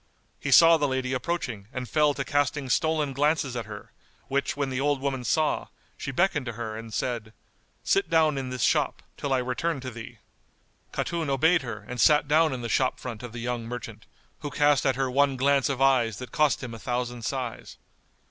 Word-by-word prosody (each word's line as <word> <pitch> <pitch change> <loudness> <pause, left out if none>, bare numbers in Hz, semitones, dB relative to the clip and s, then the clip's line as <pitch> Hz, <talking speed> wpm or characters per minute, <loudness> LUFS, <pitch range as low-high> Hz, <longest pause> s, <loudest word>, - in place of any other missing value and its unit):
He - - -4
saw 165 0 +8
the 145 -2 +1
lady 130 -1 -1
approaching 125 - -3
and 125 -1 -5
fell 150 0 +2
to 135 - -3
casting 145 -2 0
stolen 155 -2 +1
glances 145 -2 +1
at 115 -3 -4
her, 105 -1 -9 0.4
which 140 +1 -1
when 140 -2 -1
the 130 +1 -1
old 145 -1 +1
woman 135 -2 -2
saw, 155 +4 +1 0.3
she - - -6
beckoned 150 -2 +1
to 120 - -3
her 110 -1 -5
and 115 0 -8
said, 115 -2 -3 0.5
"Sit 395 0 +1
down 155 -2 +3
in 135 -2 -3
this 125 -2 -3
shop, - - +1
till 140 - -4
I 135 - +3
return 130 +5 -1
to 130 0 -6
thee." 115 -1 -9 0.7
Khatun 165 -3 -2
obeyed 160 +6 +3
her 110 -5 -7
and 125 0 -3
sat 150 -2 +5
down 155 +1 +4
in 125 -2 -4
the - - -2
shop 130 +3 +1
front 120 -4 -6
of 120 -2 -7
the 120 - -8
young 120 -1 -3
merchant, 115 -3 -7 0.3
who 145 - -5
cast 145 -1 +3
at 135 - +2
her 130 0 -1
one 140 0 +2
glance 140 +1 +2
of 135 -1 0
eyes 120 -6 +3
that 125 +1 -8
cost 150 -4 +2
him 120 -2 -6
a 115 - -8
thousand 120 -1 -3
sighs. 125 -2 -4
130 Hz, 205 wpm, -26 LUFS, 120-145 Hz, 0.7 s, saw